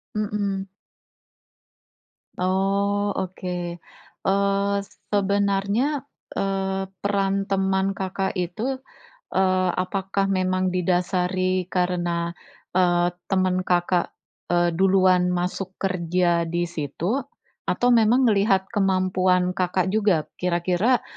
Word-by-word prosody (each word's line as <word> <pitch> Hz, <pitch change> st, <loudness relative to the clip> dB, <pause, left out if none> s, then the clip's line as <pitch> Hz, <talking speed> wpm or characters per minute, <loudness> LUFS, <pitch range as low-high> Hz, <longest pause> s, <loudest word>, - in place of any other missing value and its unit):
Mhm. 200 Hz, -2 st, -2 dB, 1.7 s
Oh, 200 Hz, +2 st, +1 dB
oke. 185 Hz, -1 st, -4 dB, 0.7 s
Eee, 200 Hz, +1 st, +2 dB, 0.4 s
sebenarnya, 200 Hz, +7 st, +1 dB, 0.3 s
eee, 195 Hz, 0 st, -1 dB, 0.2 s
peran 195 Hz, -1 st, 0 dB
teman 190 Hz, 0 st, +1 dB
Kakak 190 Hz, 0 st, -2 dB
itu, 190 Hz, +9 st, -2 dB, 0.6 s
eee, 185 Hz, -1 st, +2 dB
apakah 195 Hz, +1 st, -1 dB
memang 185 Hz, -1 st, +1 dB
didasari 185 Hz, +1 st, 0 dB
karena, 175 Hz, -2 st, -1 dB, 0.5 s
eee, 175 Hz, -1 st, +3 dB, 0.2 s
teman 185 Hz, -1 st, +1 dB
Kakak, 175 Hz, 0 st, +1 dB, 0.4 s
eee, 175 Hz, 0 st, +3 dB
duluan 185 Hz, 0 st, +4 dB
masuk 180 Hz, +1 st, -3 dB
kerja 175 Hz, -2 st, +1 dB
di 170 Hz, +1 st, -1 dB
situ 175 Hz, -, -2 dB, 0.4 s
atau 245 Hz, -, +2 dB
memang 235 Hz, +2 st, +4 dB
melihat 200 Hz, -4 st, +3 dB
kemampuan 185 Hz, -2 st, +2 dB
Kakak 185 Hz, 0 st, 0 dB
juga 200 Hz, -7 st, +2 dB
kira-kira, 180 Hz, +7 st, +1 dB
190 Hz, 90 wpm, -24 LUFS, 180-200 Hz, 1.7 s, duluan